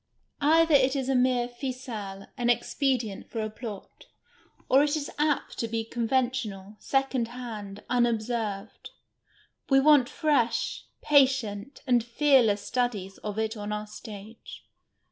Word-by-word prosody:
Either 325 +2 +4
it 270 -1 +4
is 270 -1 -2
a - - +3
mere 250 -1 +2
ficelle, 240 -6 -6
an 245 -3 0
expedient 240 -3 0
for 230 - -4
a 215 0 -2
plot, 215 -3 -9 0.6
or 265 +2 +5
it 295 +1 +1
is 295 -2 -4
apt 300 -1 0
to 230 - -1
be 225 0 -2
conventional, 230 -4 -2
second 270 -3 0
hand, 220 -5 -8
unobserved. 225 -3 -1 0.8
We 270 -1 +6
want 280 -3 +5
fresh, 275 -8 0 0.2
jmtient, 265 -4 +2
and 245 -4 +3
fearless 235 -4 +3
studies 210 -7 -2
of 210 0 -5
it 220 +1 -1
on 210 -1 -5
our 210 0 -3
stage. 215 0 -11
240 Hz, 130 wpm, -27 LUFS, 215-265 Hz, 0.8 s, We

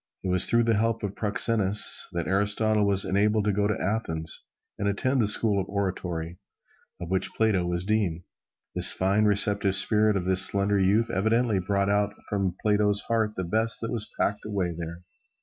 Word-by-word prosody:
It 95 - -2
was 90 0 +2
through 115 0 +3
the 115 0 +2
help 115 +1 0
of 100 -1 -3
Proxenus 105 -1 0
that 85 -2 -2
Aristotle 105 +2 +1
was 100 -1 +1
enabled 105 +2 +1
to 105 - +2
go 100 +1 +1
to 105 - -1
Athens 80 -6 -3 0.3
and 100 - -1
attend 130 +6 +1
the 105 - +2
School 105 -1 +2
of 95 - -7
Oratory, 90 -4 -3 0.6
of 90 0 -7
which 95 - 0
Plato 100 -6 +1
was 85 0 -2
dean. 100 -6 0 0.5
The - - -3
fine, 100 +3 +3
receptive 100 -1 +1
spirit 105 +1 +2
of 90 - -3
this 95 0 +2
slender 100 0 +1
youth 100 +5 +2
evidently 110 +2 +1
brought 100 +2 0
out 100 0 0
from 95 -3 -1
Plato's 105 -1 +2
heart 110 -2 0
the 95 - -3
best 110 +6 -1
that 115 - -3
was 115 -4 -3
packed 105 - 0
away 100 -5 -2
there. 85 +1 -7
100 Hz, 185 wpm, -26 LUFS, 95-105 Hz, 0.6 s, through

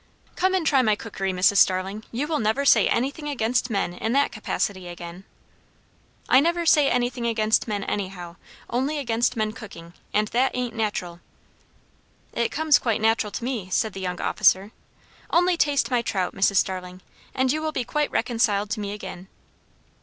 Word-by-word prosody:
"Come 375 +1 +1
and 360 -4 0
try 275 -4 +4
my 215 -4 +2
cookery, 195 -3 -4
Mrs. 185 +2 +3
Starling; 190 +3 +2
you 250 +5 -2
will 305 0 -1
never 220 +6 0
say - - +5
anything 280 +5 -1
against 245 -2 0
men 195 -5 -1
in 220 +6 -2
that 280 +1 +2
capacity 200 -4 -3
again." 175 +2 -9 1.0
"I 255 - +6
never 340 +3 +1
say 300 -3 +5
anything 245 -1 -1
against 220 -1 +1
men 205 -2 -2
anyhow; 185 -4 -5 0.3
only 265 +6 -1
against 240 -2 0
men 215 -1 0
cooking; 195 -7 -11 0.2
and 210 0 +1
that 255 +3 +1
ain't 250 -2 -2
natural." 205 -6 -3 1.1
"It 235 -1 0
comes 310 -1 +3
quite 230 -4 0
natural 220 -1 +1
to - - -5
me," 235 -7 -3
said 220 +4 0
the 195 - -7
young 180 -1 -3
officer. 195 +3 +2 0.6
"Only 355 +1 +3
taste 290 -4 +1
my 245 -1 +2
trout, 190 -5 -2
Mrs. 195 +1 +2
Starling, 185 0 -1 0.3
and 260 0 +2
you 310 +2 -1
will 315 0 -2
be 255 - -2
quite 300 +4 -1
reconciled 225 -4 0
to 225 - -2
me 205 -1 -4
again." 190 -3 -8
225 Hz, 175 wpm, -24 LUFS, 195-260 Hz, 1.1 s, I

